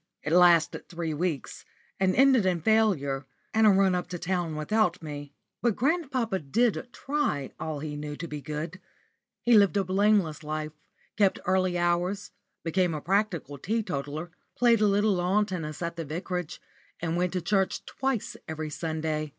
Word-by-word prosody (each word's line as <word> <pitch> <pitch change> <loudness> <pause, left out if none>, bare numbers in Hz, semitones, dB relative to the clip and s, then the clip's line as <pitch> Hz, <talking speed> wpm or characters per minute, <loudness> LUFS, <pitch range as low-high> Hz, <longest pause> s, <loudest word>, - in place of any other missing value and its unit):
It 150 - -1
lasted 175 -2 +4
three 170 -2 -3
weeks, 155 -3 -3 0.4
and 185 -1 +2
ended 265 -4 +5
in 185 -2 +1
failure, 155 -11 +2 0.3
and 220 0 +5
a - - +8
run 195 -1 +4
up 180 -1 -1
to 180 0 -5
town 175 -2 -2
without 180 +3 +1
me. 145 -1 -7 0.3
But 235 -4 +2
grandpapa 260 - 0
did 230 - 0
try 270 - -2
all 155 -3 -4
he 150 -1 -4
knew 150 0 -5
to 170 - -6
be 150 -2 -6
good. 155 +5 -5 0.6
He 240 - +4
lived 205 -1 +5
a 200 - +2
blameless 190 -4 +2
life, 155 0 -3 0.5
kept 200 -3 +3
early 185 -1 +2
hours, 175 +3 0 0.3
became 175 0 +1
a - - -3
practical 175 -6 -1
teetotaler, 165 - -3 0.3
played 235 -2 +4
a 210 - +5
little 205 +1 +3
lawn 185 +4 +2
tennis 165 -5 -5
at 170 0 -4
the 165 - -3
vicarage, 175 +2 -4 0.4
and 165 -1 -2
went 180 +1 0
to 185 - 0
church 190 +2 0
twice 265 -4 -2
every 155 -1 -4
Sunday. 155 -1 -2
180 Hz, 165 wpm, -28 LUFS, 155-205 Hz, 0.6 s, a